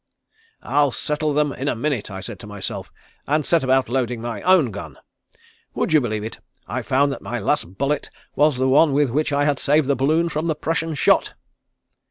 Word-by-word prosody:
"'I'll 145 0 +2
settle 150 +3 -2
them 145 -1 +1
in 135 - -5
a - - +1
minute,' 120 -3 -2
I 95 -1 -7
said - - -8
to - - -10
myself, 105 -2 -6 0.4
and 150 0 +1
set 170 -3 +2
about 130 0 +2
loading 125 -1 -1
my 115 -2 -5
own 180 -10 +4
gun. 80 -9 -8 0.8
Would - - 0
you 155 - +6
believe 110 -4 -2
it, 110 - -7 0.3
I - - -3
found 140 +2 +2
that - - -6
my - - -4
last 90 +3 -1
bullet 140 +2 -1 0.3
was 150 -2 +3
the 130 +1 +1
one 145 +2 +4
with 140 -3 +2
which 150 +4 0
I 145 0 +2
had 145 -2 +1
saved 150 +1 +3
the 140 - +2
balloon 155 +6 +2
from 160 0 -2
the 160 - 0
Prussian 165 +1 -2
shot?" - - +2
140 Hz, 205 wpm, -22 LUFS, 120-150 Hz, 0.8 s, you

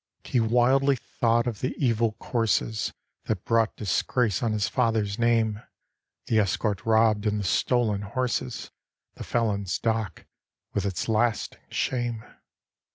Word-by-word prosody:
He 125 - 0
wildly 125 +5 +3
thought 115 -1 0
of 115 -5 -3
the 130 - -2
evil 115 -4 +1
courses 110 -2 -1 0.3
That 105 -5 -2
brought 115 -1 +2
disgrace 105 +1 0
on 115 -2 +1
his 105 -2 0
father's 110 -4 0
name; 115 -2 +2 0.6
The 110 - +2
escort 100 +1 -1
robbed, 110 -1 +3
and 105 0 0
the - - -3
stolen 110 +1 +1
horses, 125 +4 -3 0.4
The - - -8
felon's 100 -5 0
dock 110 -3 -2 0.5
with 100 -1 0
its 95 - -3
lasting 115 0 0
shame. 120 -3 -2
110 Hz, 130 wpm, -26 LUFS, 105-120 Hz, 0.6 s, wildly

